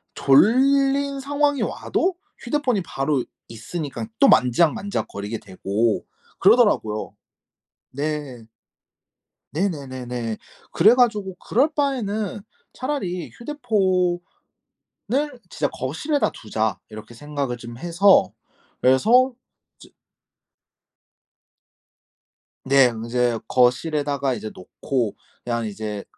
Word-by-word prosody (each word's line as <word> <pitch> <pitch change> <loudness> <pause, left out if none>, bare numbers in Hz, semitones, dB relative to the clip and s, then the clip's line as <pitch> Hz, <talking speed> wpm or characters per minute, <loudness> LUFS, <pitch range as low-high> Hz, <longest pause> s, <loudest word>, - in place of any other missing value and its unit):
졸린 275 - +3
상황이 285 +1 0
와도 370 0 -1 0.2
휴대폰이 250 -5 0
바로 135 -4 -1 0.2
있으니깐 115 +1 -6
또 - - +7
만지작만지작거리게 125 - +1
되고 100 +3 -1 0.3
그러더라고요. 200 - +3 0.8
네. 140 -4 -4 1.1
네네네네. 130 - -3 0.3
그래 210 +8 +6
가지고 210 -6 +1
'그럴 265 - +1
바에는 220 -9 -1 0.3
차라리 225 - -3
휴대폰을 195 -10 -1 1.1
진짜 145 -2 -1
거실에다 210 - -1
두자.' 110 -1 -2
이렇게 110 +1 -11
생각을 140 -1 -4
좀 120 0 -10
해서 175 - +4 0.5
그래서 230 - +4 0.5
이제 - - -15 2.7
네. 135 0 +5
인제 115 +1 0
거실에다가 140 +2 +1
이제 110 -1 -6
놓고 115 +4 -3 0.3
그냥 120 -1 -2
이제 105 -1 -5
150 Hz, 220 characters per minute, -22 LUFS, -, 2.7 s, 또